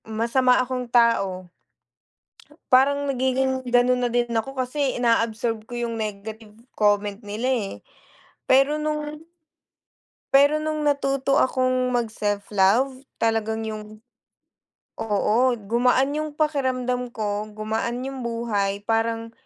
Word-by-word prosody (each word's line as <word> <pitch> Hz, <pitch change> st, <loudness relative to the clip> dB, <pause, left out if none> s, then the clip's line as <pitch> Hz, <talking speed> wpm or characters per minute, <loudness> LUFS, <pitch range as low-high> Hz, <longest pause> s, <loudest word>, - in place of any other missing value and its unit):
Masama 235 Hz, +3 st, +2 dB
akong 250 Hz, 0 st, -3 dB
tao. 195 Hz, -7 st, +2 dB, 1.2 s
Parang 280 Hz, +2 st, +4 dB
nagiging 260 Hz, -1 st, 0 dB
ganun 245 Hz, +1 st, +3 dB
na 245 Hz, -, +1 dB
din 240 Hz, 0 st, 0 dB
ako 235 Hz, +4 st, -2 dB
kasi 260 Hz, +1 st, -1 dB
inaabsorb 230 Hz, -2 st, 0 dB
ko 240 Hz, -, -7 dB
yung 235 Hz, -1 st, -3 dB
negative 215 Hz, +1 st, -6 dB, 0.2 s
comment 205 Hz, -1 st, +1 dB
nila 220 Hz, +3 st, -3 dB
eh 220 Hz, -6 st, -1 dB, 0.8 s
pero 275 Hz, +3 st, +4 dB
nung 300 Hz, 0 st, -3 dB, 1.1 s
pero 285 Hz, +3 st, +5 dB
nung 310 Hz, -1 st, -1 dB
natuto 275 Hz, -1 st, +1 dB
akong 255 Hz, -2 st, +1 dB
mag 240 Hz, -2 st, 0 dB
self 205 Hz, -2 st, -3 dB
love 225 Hz, +8 st, +3 dB, 0.2 s
talagang 225 Hz, 0 st, 0 dB
yung 215 Hz, 0 st, -7 dB, 1.0 s
oo 210 Hz, -1 st, 0 dB, 0.2 s
gumaan 245 Hz, +5 st, +1 dB
yung 305 Hz, 0 st, -3 dB
pakiramdam 255 Hz, -5 st, 0 dB
ko, 210 Hz, -1 st, -2 dB
gumaan 220 Hz, +3 st, -2 dB
yung 270 Hz, 0 st, -5 dB
buhay 205 Hz, -4 st, -2 dB
parang 225 Hz, +1 st, -1 dB
240 Hz, 115 wpm, -24 LUFS, 220-265 Hz, 1.2 s, pero